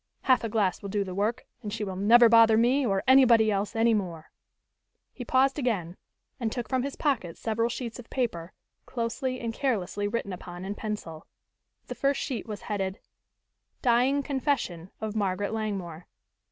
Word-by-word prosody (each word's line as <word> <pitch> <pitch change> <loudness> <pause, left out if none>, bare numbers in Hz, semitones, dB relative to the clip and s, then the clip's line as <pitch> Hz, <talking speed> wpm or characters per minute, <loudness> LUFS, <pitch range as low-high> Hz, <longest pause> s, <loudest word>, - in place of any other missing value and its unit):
"Half 255 -2 +3
a 225 - -2
glass 205 -4 0
will 200 - -6
do 205 0 0
the 185 -2 -6
work 215 +6 -1 0.2
and 210 -3 -5
she 220 0 -3
will 190 -2 -4
never 230 +5 +6
bother 225 -1 +6
me 250 +5 +3
or 195 -5 0
anybody 240 -5 +6
else 200 +1 -2
any 225 +1 +3
more." 175 -7 -3 0.8
He 250 - -7
paused 265 +4 +2
again 195 - -1 0.4
and 230 -3 -1
took 240 -2 -4
from 260 -1 0
his 275 +2 -4
pocket 235 - -1
several 230 +1 -1
sheets 240 0 -5
of 235 - -11
paper, 185 -10 -2 0.4
closely 255 +2 -3
and 230 -1 -3
carelessly 205 -6 -1
written 205 -2 -3
upon 180 0 -8
in 200 - -3
pencil. 205 -8 -6 0.6
The - - -6
first 275 0 0
sheet 250 -6 -4
was 210 -2 -6
headed: 195 -2 -3 0.8
_Dying 260 +3 +3
Confession 265 - -2
of 215 -1 -4
Margaret 200 0 -1
Langmore. 195 -7 -4
220 Hz, 170 wpm, -27 LUFS, 195-245 Hz, 0.8 s, never